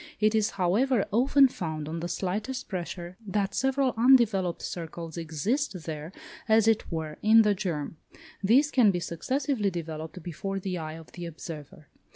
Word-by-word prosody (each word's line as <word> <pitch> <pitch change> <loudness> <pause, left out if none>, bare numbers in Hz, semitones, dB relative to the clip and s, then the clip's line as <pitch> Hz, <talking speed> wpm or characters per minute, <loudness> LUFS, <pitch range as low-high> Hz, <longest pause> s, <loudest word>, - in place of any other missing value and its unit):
It 215 +1 +3
is, 220 -1 +2
however, 205 +6 +2
often 270 +5 +5
found, 155 - -5
on 165 +2 -4
the 170 - -3
slightest 215 +9 -3
pressure, 175 -1 -5
that 200 0 -1
several 270 0 +1
undeveloped 225 -7 +4
circles 165 -1 -6
exist 170 - -2
there, 155 0 -6 0.4
as 220 0 +5
it 225 -3 +2
were, 160 -2 -4
in 220 +1 +7
the 210 -1 +3
germ; 165 -6 -3 0.5
these 265 +9 +4
can 240 -6 +5
be 180 -2 +1
successively 255 - -1
developed 160 -1 -6
before 195 +4 -4
the 185 -2 -3
eye 155 -1 -5
of 160 0 -12
the 175 -1 -7
observer. 155 -2 -9
190 Hz, 160 wpm, -28 LUFS, 165-225 Hz, 0.5 s, in